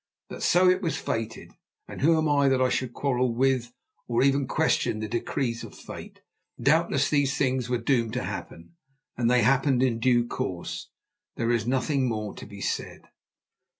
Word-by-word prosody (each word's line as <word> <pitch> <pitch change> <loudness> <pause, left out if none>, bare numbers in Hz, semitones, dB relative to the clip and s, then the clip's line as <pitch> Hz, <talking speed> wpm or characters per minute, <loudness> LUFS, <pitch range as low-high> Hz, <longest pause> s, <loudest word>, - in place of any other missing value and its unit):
But - - -8
so 180 +2 +4
it 185 +1 +4
was 165 -4 -1
fated, 115 0 -4 0.4
and - - -8
who 160 +3 +4
am 155 0 +1
I 140 -2 +3
that 130 -1 +2
I 130 0 +3
should 125 -1 -1
quarrel 125 -3 0
with 130 -1 +1 0.4
or 120 +1 +2
even 140 0 +2
question - - +1
the 110 - -3
decrees 120 +1 -2
of - - -10
fate? - - -10 0.4
Doubtless 140 -1 +2
these 140 -2 +1
things 130 -3 0
were 125 - +1
doomed 115 -2 0
to 125 - -2
happen, 85 - -7 0.4
and 120 -1 +1
they 125 -2 +4
happened 135 +1 +3
in 120 -3 +1
due 120 -1 +3
course. 90 -6 -5 0.5
There 115 0 0
is 120 -1 0
nothing 130 +1 +1
more 105 -2 -3
to - - -9
be 100 -1 -10
said. - - -3
130 Hz, 180 wpm, -26 LUFS, 115-140 Hz, 0.5 s, so